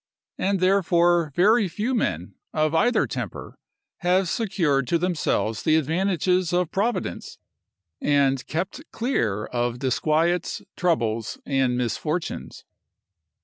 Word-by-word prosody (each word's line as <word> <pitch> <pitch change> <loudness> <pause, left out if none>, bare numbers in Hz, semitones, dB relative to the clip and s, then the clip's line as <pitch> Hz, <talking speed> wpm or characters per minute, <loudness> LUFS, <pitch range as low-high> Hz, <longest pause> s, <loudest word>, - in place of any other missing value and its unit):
And, 195 0 +1
therefore, 175 -3 +3
very 210 +3 +4
few 210 +9 -2
men, 90 - -1 0.2
of 155 0 +1
either 240 +10 +3
temper, - - -6 0.4
have 180 +1 +2
secured 165 - 0
to 170 - +2
themselves 160 - -1
the 155 - +3
advantages 180 +3 +1
of 180 -2 +1
providence, 200 - -2 0.6
and 140 -2 +2
kept 175 - -3
clear 110 - -1
of 120 0 -2
disquiets, 155 +7 0
troubles, 115 - 0
and 135 -3 +1
misfortunes. 150 +8 -3
165 Hz, 105 wpm, -24 LUFS, 135-185 Hz, 0.6 s, very